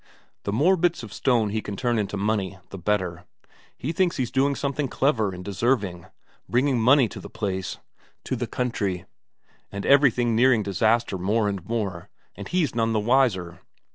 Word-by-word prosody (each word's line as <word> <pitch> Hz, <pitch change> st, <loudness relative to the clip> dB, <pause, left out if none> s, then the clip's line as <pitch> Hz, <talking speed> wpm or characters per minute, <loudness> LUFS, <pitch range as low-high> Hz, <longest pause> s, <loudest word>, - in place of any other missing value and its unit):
The 100 Hz, -, -1 dB
more 160 Hz, -, +3 dB
bits 170 Hz, -6 st, +1 dB
of 105 Hz, -, -9 dB
stone 120 Hz, -5 st, +1 dB
he 110 Hz, +1 st, -2 dB
can 105 Hz, -, -6 dB
turn 120 Hz, 0 st, 0 dB
into 105 Hz, -1 st, -2 dB
money, 100 Hz, -2 st, -1 dB
the 95 Hz, -, -7 dB
better; 90 Hz, -2 st, -1 dB, 0.5 s
he 145 Hz, -, -3 dB
thinks 175 Hz, +1 st, +1 dB
he's 125 Hz, -4 st, -2 dB
doing 140 Hz, +1 st, +2 dB
something 140 Hz, 0 st, -2 dB
clever 120 Hz, -6 st, +1 dB
and 90 Hz, 0 st, -8 dB
deserving, 100 Hz, -4 st, -1 dB, 0.4 s
bringing 125 Hz, 0 st, +2 dB
money 130 Hz, +2 st, +5 dB
to -, -, -8 dB
the -, -, -10 dB
place, 95 Hz, -3 st, -3 dB, 0.5 s
to -, -, -2 dB
the 120 Hz, -1 st, -3 dB
country, 100 Hz, -7 st, -2 dB, 0.7 s
and 100 Hz, 0 st, -5 dB
everything 125 Hz, -4 st, +4 dB
nearing 120 Hz, -2 st, +4 dB
disaster 105 Hz, +1 st, +1 dB
more 105 Hz, +4 st, +1 dB
and 100 Hz, -4 st, -3 dB
more, 100 Hz, -7 st, -3 dB, 0.3 s
and -, -, -8 dB
he's 175 Hz, -5 st, 0 dB
none 115 Hz, -1 st, +1 dB
the 110 Hz, -, +2 dB
wiser. 105 Hz, -7 st, +1 dB
115 Hz, 170 wpm, -25 LUFS, 100-130 Hz, 0.7 s, money